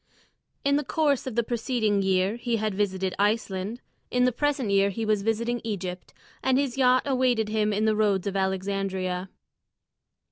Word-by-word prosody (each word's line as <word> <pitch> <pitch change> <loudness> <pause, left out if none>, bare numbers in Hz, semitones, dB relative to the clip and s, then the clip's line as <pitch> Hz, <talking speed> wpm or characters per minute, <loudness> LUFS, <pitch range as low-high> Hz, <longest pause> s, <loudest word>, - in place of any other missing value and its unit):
In 280 +1 +3
the 295 - -1
course 290 -2 +1
of 250 - -4
the 235 - +2
preceding 225 -3 0
year 190 +2 +1
he 240 -1 -1
had 215 -2 -1
visited 190 -2 -1
Iceland; 205 +1 -1 0.3
in 250 0 +2
the 250 - +4
present 270 -3 0
year 200 0 +4
he 220 +3 -3
was 215 -1 +1
visiting 230 +3 -1
Egypt, 185 -5 -5 0.3
and 260 -1 +2
his 275 -3 0
yacht 255 -1 +4
awaited 250 -5 +1
him 215 -1 +1
in 210 +1 0
the 215 -1 +3
roads 205 -3 +1
of 200 -1 -2
Alexandria. 190 -1 -2
215 Hz, 170 wpm, -26 LUFS, 195-245 Hz, 0.3 s, the